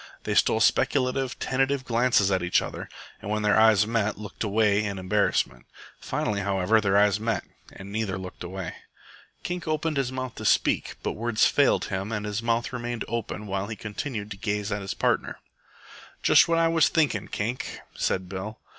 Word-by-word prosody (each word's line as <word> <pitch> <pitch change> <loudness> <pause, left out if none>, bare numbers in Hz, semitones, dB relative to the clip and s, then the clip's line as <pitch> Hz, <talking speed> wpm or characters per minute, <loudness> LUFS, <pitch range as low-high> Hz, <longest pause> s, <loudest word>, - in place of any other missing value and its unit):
They - - -1
stole - - +3
speculative, 130 -1 +2
tentative 135 +1 0
glances 115 -5 +3
at 95 -1 +1
each 90 0 +3
other, - - -6 0.3
and 100 - -6
when 105 0 -1
their 105 - +3
eyes 110 -3 +6
met 110 -2 0
looked 105 0 -6
away 105 0 +2
in 100 -2 -3
embarrassment. 95 -10 0 0.3
Finally, 105 -1 -2
however, 100 +2 +2
their 100 -1 +2
eyes 105 0 +4
met 115 0 -1 0.3
and 95 +1 -10
neither 105 -3 -2
looked 95 -1 -8
away. 95 0 -5 0.7
Kink 175 -1 -4
opened 155 -1 -1
his 135 -2 0
mouth 130 -2 -4
to 110 - -6
speak, - - +2
but - - -1
words 115 0 +1
failed - - +3
him 95 +3 -3
and 105 -1 -2
his 105 +1 -2
mouth 115 +1 0
remained 120 -1 -3
open 115 -2 -4
while 100 0 -2
he 110 - -5
continued 105 +1 -5
to 100 - -6
gaze 105 -1 -2
at 105 0 -2
his 95 - -4
partner. - - 0 0.9
"Just - - +6
what 165 0 +2
I 165 0 +4
was 165 -2 +4
thinken', 145 - +1
Kink," 115 +5 -3
said 95 -1 -1
Bill. 95 +4 -6
105 Hz, 180 wpm, -26 LUFS, 100-120 Hz, 0.9 s, eyes